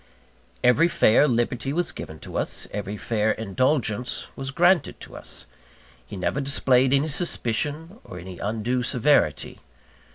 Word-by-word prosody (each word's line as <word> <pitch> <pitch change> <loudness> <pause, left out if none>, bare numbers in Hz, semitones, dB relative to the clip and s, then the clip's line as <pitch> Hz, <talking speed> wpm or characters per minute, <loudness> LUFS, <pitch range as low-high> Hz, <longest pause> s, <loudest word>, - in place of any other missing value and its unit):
Every 125 +7 +5
fair 145 -3 +4
liberty 120 +1 -1
was 170 +3 -1
given 80 - -8
to - - -10
us; - - -1
every 105 0 -4
fair 110 0 0
indulgence 120 +2 0
was 135 0 -5
granted 175 +3 +2
to - - -10
us. - - -7 0.6
He 65 - -9
never 110 +9 -1
displayed 135 -2 +3
any 140 +3 +2
suspicion, 155 - -2
or 90 - -10
any 90 0 -9
undue 115 +4 -1
severity. 125 - +1
125 Hz, 135 wpm, -24 LUFS, 110-145 Hz, 0.6 s, Every